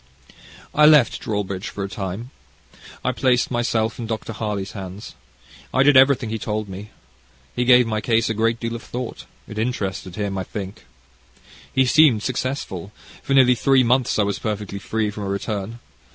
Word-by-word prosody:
"I 150 0 +6
left 150 -6 +5
Dawlbridge 100 -3 -3
for 100 - -5
a - - -2
time. 100 +4 -6 0.7
I 130 - +2
placed 125 -1 +1
myself 115 -2 0
in 115 - -4
Dr. 110 0 -4
Harley's 105 -3 -3
hands. 95 0 -8 0.6
I 130 - +3
did 145 0 +5
everything 130 -3 +5
he 110 - -3
told 105 0 -3
me. 100 +2 -8 0.7
He 125 - 0
gave 125 0 +6
my 110 -1 -2
case 115 +2 +2
a 115 - 0
great 115 +1 0
deal 115 0 -3
of 115 - -6
thought. 125 +1 -6 0.2
It 105 - -6
interested 100 -6 -3
him, 100 -2 -2
I - - -2
think. 95 -6 -8 0.8
He 130 - +3
seemed 125 -4 +5
successful. 125 - -3 0.3
For 135 - 0
nearly 130 -2 +6
three 130 +2 +3
months 125 +1 +2
I 105 - +3
was 100 0 -2
perfectly 105 -2 -4
free 110 +1 -2
from 105 0 -6
a - - -3
return. 100 +2 -3
110 Hz, 175 wpm, -22 LUFS, 100-125 Hz, 0.8 s, I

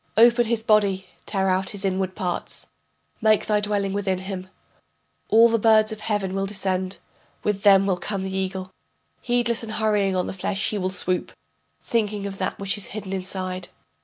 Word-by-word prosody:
Open 235 +1 +6
his 225 -1 0
body, 200 -4 +3 0.2
tear 195 -2 0
out 190 +1 +1
his 200 -1 -2
inward 190 -1 -1
parts, 180 -2 -2 0.6
Make 215 -1 +4
thy 210 -1 +2
dwelling 205 -2 -1
within 195 -2 0
him. 185 0 -6 0.8
All 230 +2 +7
the 230 0 +1
birds 215 0 +5
of 215 - -6
heaven 205 -4 -1
will 195 0 -1
descend, 190 -1 -1 0.5
with 210 -2 0
them 195 -1 +6
will 190 -2 +1
come 195 +2 -3
the 190 0 -4
eagle, 190 0 -3 0.5
Heedless 240 -1 +1
and 220 -2 -6
hurrying 210 -3 +1
on 180 - +1
the - - -4
flesh 195 +2 -2
he 210 - -2
will 185 0 0
swoop, 185 -1 -1 0.5
Thinking 210 -3 -1
of 195 -1 -6
that - - -2
which 200 +1 -1
is 200 - -4
hidden 200 -2 -6
inside. 185 -1 -4
195 Hz, 180 wpm, -24 LUFS, 190-215 Hz, 0.8 s, All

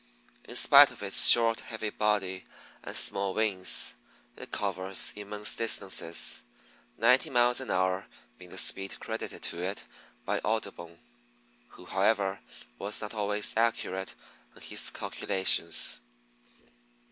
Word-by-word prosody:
In 120 - -9
spite 140 +2 +7
of - - -11
its 100 - +7
short, 115 -1 +7
heavy 110 -2 -7
body 95 -3 -2 0.4
and - - -8
small 100 -1 -1
wings, 95 -5 +2 0.4
it - - -11
covers 95 -1 -3
immense 105 0 -3
distances, 95 -7 -1 0.6
ninety 125 +3 +2
miles 125 0 +2
an 130 - -9
hour 95 +1 -1 0.3
being 90 -1 -13
the 95 - -11
speed 95 +1 -1
credited - - -7
to 85 - -1
it 95 +2 -5 0.4
by - - -2
Audubon, 85 -1 -5 0.7
who, - - -16
however, 95 0 -1 0.4
was 100 +2 -2
not 105 +1 -7
always 105 -1 -1
accurate 110 -4 -2 0.4
in - - -15
his - - -2
calculations. 90 -3 +2
100 Hz, 125 wpm, -28 LUFS, 95-110 Hz, 0.7 s, spite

